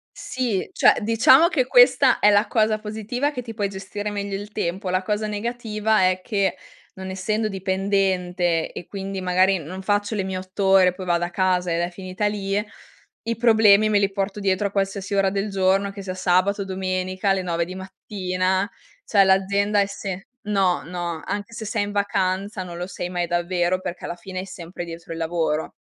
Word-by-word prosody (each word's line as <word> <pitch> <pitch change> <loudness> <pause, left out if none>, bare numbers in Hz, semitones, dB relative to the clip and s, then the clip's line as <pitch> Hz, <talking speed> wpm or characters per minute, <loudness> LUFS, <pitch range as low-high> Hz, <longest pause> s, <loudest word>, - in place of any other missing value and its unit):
Sì, 240 -7 -2
cioè - - +5
diciamo 230 +8 +6
che 290 -8 +1
questa - - +5
è 210 - +6
la 205 +2 +4
cosa 215 -1 +2
positiva, 220 +6 -2
che 250 - -5
ti 230 -2 -8
puoi 205 -2 -1
gestire 200 +2 -5
meglio 200 -1 -3
il 205 +2 -7
tempo; 185 -1 -3
la 185 +1 0
cosa 210 +1 -1
negativa 215 -2 0
è 185 - -1
che 195 -2 0 0.4
non 190 0 -7
essendo 210 +4 -1
dipendente, 190 -3 0
e 175 - -8
quindi 195 -1 -5
magari 185 +1 +3
non 180 +5 -7
faccio 205 +2 0
le 195 - -1
mie 190 -1 -3
8 185 +1 -4
ore, 190 -2 +5
poi 185 0 -8
vado 175 -1 +1
a 175 - -2
casa 180 -2 +1
ed 170 - 0
è 175 - 0
finita 185 +2 -4
lì, 200 -1 -1 0.6
i 230 +1 -2
problemi 220 -3 +5
me 210 -1 +3
li 200 0 +1
porto 195 +1 -3
dietro 195 +1 +1
a - - -8
qualsiasi 195 0 -2
ora 195 -1 +3
del 200 +2 -2
giorno, 195 0 +1
che 200 0 -8
sia 185 -1 -4
sabato, 185 +2 +1
domenica, 185 0 -2
alle 195 -1 +2
9 170 -2 -1
di 180 +2 -7
mattina, 190 0 -2 0.4
cioè 200 -2 +4
l'azienda 200 +2 +2
è 200 - +4
se 195 -1 -6 0.2
no, 195 -4 +1
no 170 -2 -4
anche 205 +2 -4
se 225 - -6
sei 215 0 -1
in 205 - -4
vacanza, 195 0 -1
non 175 -1 -8
lo 180 +1 -4
sei 180 -1 -5
mai 175 -1 -2
davvero 175 +1 0
perché 180 -1 -6
alla 175 - -4
fine 185 +1 -6
è 190 - -7
sempre 175 -1 -8
dietro 165 -1 -8
il 165 - -7
lavoro. 160 -2 -1
195 Hz, 195 wpm, -23 LUFS, 185-205 Hz, 0.6 s, diciamo